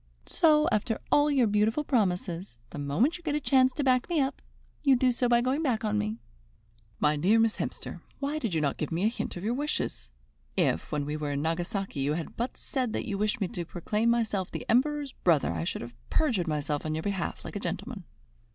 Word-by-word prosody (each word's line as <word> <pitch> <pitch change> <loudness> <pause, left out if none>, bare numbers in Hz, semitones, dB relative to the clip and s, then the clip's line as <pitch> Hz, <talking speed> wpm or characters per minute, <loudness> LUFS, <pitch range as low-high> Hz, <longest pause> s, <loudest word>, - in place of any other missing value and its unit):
So, 305 -3 +4
after 215 +1 0
all 295 0 +5
your 270 -4 +4
beautiful 215 +6 +2
promises, 185 - -1
the - - -6
moment 195 - +1
you - - -19
get 300 -3 -1
a - - +1
chance 260 -2 +4
to 290 - -2
back 255 +1 +2
me 340 -3 +2
up, 270 0 -1 0.4
you 275 -3 +6
do 255 0 +3
so 245 0 +1
by 240 0 +5
going 260 +5 0
back 235 -8 0
on 210 0 +1
me." 215 +1 -2 0.8
"My 150 0 +3
dear 190 +10 +3
Miss 225 -1 +2
Hemster, - - -5 0.2
why 285 +2 -2
did 225 - -2
you 160 - +2
not 140 -2 0
give 155 - -3
me 165 +3 0
a - - +5
hint 230 - -4
of 175 - -7
your 225 +3 0
wishes? 250 - -2 0.5
If, 80 - +1
when 150 -2 -1
we 150 +1 -3
were 150 -1 -2
in 140 +1 -1
Nagasaki, 175 +1 -2
you 140 +2 +1
had 165 0 -4
but 240 +2 -3
said 255 -5 -2
that - - -2
you 200 -1 -3
wished 215 +3 +1
me 195 - 0
to 175 - -4
proclaim 210 +7 -1
myself 215 -5 +1
the - - -6
Emperor's 285 +3 +2
brother, 155 - +2
I 80 -1 -2
should - - -3
have 120 0 -9 0.2
perjured 230 - +1
myself 150 -1 -1
on 155 0 -2
your 160 - -3
behalf 195 -4 -3
like - - -7
a - - -1
gentleman." 210 0 -4
215 Hz, 225 wpm, -29 LUFS, 165-255 Hz, 0.8 s, you